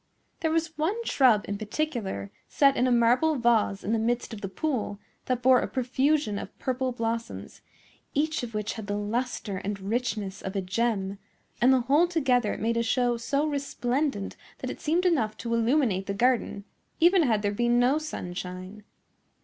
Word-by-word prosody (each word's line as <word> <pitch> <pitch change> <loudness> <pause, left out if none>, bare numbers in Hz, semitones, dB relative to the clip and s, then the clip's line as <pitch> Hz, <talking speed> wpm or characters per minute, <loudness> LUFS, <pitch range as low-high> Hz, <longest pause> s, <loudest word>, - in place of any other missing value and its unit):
There 320 - 0
was 325 0 -1
one 330 +7 +1
shrub 240 - +4
in 200 0 -3
particular, 215 - -3 0.2
set 275 -1 +4
in 255 - +2
a - - +2
marble 245 +7 +4
vase 230 -5 +2
in 215 - -1
the 225 - +2
midst 235 +1 -1
of 210 - -7
the 195 - -4
pool, 230 -4 -2 0.3
that 250 -1 -1
bore 255 0 +6
a - - -2
profusion 260 -3 0
of - - -9
purple 260 0 -1
blossoms, 230 -1 -4 0.5
each 310 +2 +1
of 235 -3 -6
which 210 0 -2
had 220 -3 -7
the 205 0 -1
lustre 210 -1 -2
and 200 +1 -4
richness 205 -2 -2
of 190 +1 -5
a 195 - 0
gem; 200 0 -1 0.4
and 250 +2 +6
the 260 -1 +4
whole 285 +8 +3
together 260 -10 +1
made 230 +1 0
a - - +2
show 245 +1 +1
so 280 +5 0
resplendent 275 -5 -2 0.2
that - - -4
it - - -9
seemed 335 +4 +1
enough 245 -12 +1
to 235 0 -3
illuminate 230 -5 +1
the 200 - -2
garden, 240 -3 +1 0.4
even 355 +2 +5
had 225 -8 +2
there 205 - +1
been 240 +3 +2
no 260 +5 +3
sunshine. 185 -6 -6
240 Hz, 180 wpm, -27 LUFS, 205-275 Hz, 0.5 s, bore